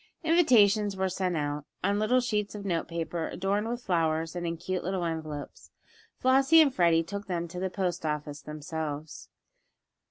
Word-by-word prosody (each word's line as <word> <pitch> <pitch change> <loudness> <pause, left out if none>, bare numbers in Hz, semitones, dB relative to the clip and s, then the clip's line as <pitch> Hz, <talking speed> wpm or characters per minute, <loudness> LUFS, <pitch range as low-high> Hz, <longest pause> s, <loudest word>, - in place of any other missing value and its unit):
Invitations 215 - +4
were 190 0 0
sent 185 -2 -1
out, 145 0 -2 0.2
on 200 +2 +1
little 250 +4 +3
sheets 210 -4 -1
of 200 -1 -7
note 170 -4 -1
paper, 165 0 -3
adorned 200 +4 -1
with 240 +1 -4
flowers, 165 -2 0
and 175 -1 -3
in 165 0 -3
cute 185 +2 -3
little 185 -1 -1
envelopes. 155 -3 -5 0.5
Flossie 270 +5 +5
and 295 -4 +5
Freddie 170 -4 +3
took 200 +4 -6
them 170 -2 -2
to 180 +2 -7
the 190 +1 -1
post 180 -3 -2
office 150 -1 -3
themselves. 150 0 -6
180 Hz, 165 wpm, -28 LUFS, 160-205 Hz, 0.5 s, Flossie